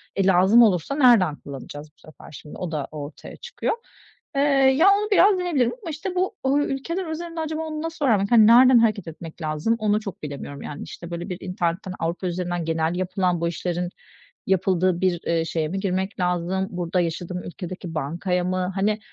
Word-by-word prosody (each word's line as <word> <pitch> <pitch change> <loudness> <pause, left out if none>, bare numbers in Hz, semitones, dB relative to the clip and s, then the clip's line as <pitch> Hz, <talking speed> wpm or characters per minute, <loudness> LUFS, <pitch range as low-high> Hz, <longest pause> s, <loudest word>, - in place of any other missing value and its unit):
e, 195 - +1
lazım 190 +5 +6
olursa 200 - +1
nereden 235 - +5
kullanacağız 145 +2 -9
bu - - -34
sefer 155 - -15
şimdi 150 0 -11
o 180 -3 -4
da 150 -3 -3
ortaya 145 -1 -8
çıkıyor. - - -3 0.6
Eee, 275 - +2 0.4
ya 335 +6 +5
onu 420 +1 -1
biraz 395 -1 +5
deneyebilirim 310 -10 +1
ama, 340 - -5
işte, 330 +5 -5
bu, 375 +4 0
uuu, 270 +2 +2
ülkeler 335 +7 -3
üzerinde 330 +1 -5
acaba 315 0 -3
onu 310 -1 -4
nasıl 325 -2 -3
öğrenmek, 205 -5 +2
hani, 220 -3 +7
nereden 250 +2 +7
hareket 215 -5 +1
etmek 165 +1 -9
lazım 155 +8 0
onu 210 -1 +2
çok 205 -6 -8
bilemiyorum, 140 -1 -7
yani. 145 - -7
İşte, 170 0 -9
böyle, 170 +3 -5
bir 180 - -4
internetten, 180 0 -2
Avrupa 170 +3 -2
üzerinden 175 -1 -3
genel 160 +1 0
yapılan 180 -1 -1
bu 170 - +1
işlerin 175 +1 -2 0.6
yapıldığı 185 -1 +1
bir, 180 -2 +1
eee, 165 -1 +1
şeye 160 -1 -1
mi 190 +5 -3
girmek 190 +1 -2
lazım, 180 +1 0
burada 180 0 -1
yaşadığım 175 +1 -4
ülkedeki 180 -1 -7
bankaya 175 +5 -1
mı, 185 +1 -1
hani, 210 +2 +1
185 Hz, 185 wpm, -23 LUFS, 170-235 Hz, 0.6 s, hani